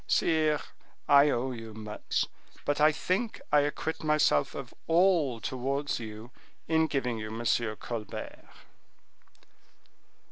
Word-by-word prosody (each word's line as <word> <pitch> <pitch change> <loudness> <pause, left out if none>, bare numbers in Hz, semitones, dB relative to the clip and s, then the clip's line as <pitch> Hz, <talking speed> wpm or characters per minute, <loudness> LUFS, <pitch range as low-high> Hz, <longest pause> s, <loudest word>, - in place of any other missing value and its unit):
Sire, 155 -2 +2 0.5
I 140 +1 +7
owe 130 0 0
you 115 -3 -8
much, 105 -1 -2 0.4
but 145 0 0
I 155 +1 +7
think 190 +8 -1
I 150 - +6
acquit 145 +3 -2
myself 150 - +2
of - - -7
all 165 -8 +3
towards 135 +6 -2
you 110 +1 -8 0.4
in 160 0 +3
giving 125 -6 -1
you 110 - -4
M. 115 +2 -5 0.3
Colbert." 110 -1 -6
140 Hz, 115 wpm, -29 LUFS, 115-155 Hz, 0.5 s, I